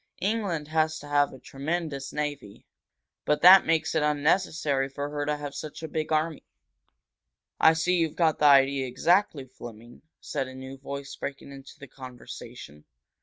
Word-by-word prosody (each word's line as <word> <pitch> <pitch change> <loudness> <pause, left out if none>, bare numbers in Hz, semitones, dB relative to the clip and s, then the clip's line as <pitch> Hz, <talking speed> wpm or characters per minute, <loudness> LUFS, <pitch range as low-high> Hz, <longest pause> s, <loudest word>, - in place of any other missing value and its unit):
England 195 -7 -1
has 155 0 +1
to 145 - -11
have 145 -1 +2
a - - -11
tremendous 140 0 -4
navy, 145 -9 -5 0.6
but 150 0 0
that 185 +1 +9
makes 160 0 +1
it 160 - +1
unnecessary 150 -2 +1
for 145 +1 -5
her 145 -1 -3
to 150 0 0
have 145 -1 -7
such 155 +2 -8
a - - -3
big 155 0 -4
army." 155 0 0 1.2
"I 160 - +6
see 180 +3 +1
you've 165 -3 0
got 160 -3 +1
the 150 - +2
idea 135 -1 +5
exactly, 160 +3 +1
Fleming," 120 -2 -12 0.2
said 135 -3 -4
a 130 - -10
new 130 +1 -8
voice, 140 0 -7
breaking 140 0 -7
into 135 0 -12
the 140 - -11
conversation. 120 - -11
145 Hz, 165 wpm, -27 LUFS, 135-160 Hz, 1.2 s, that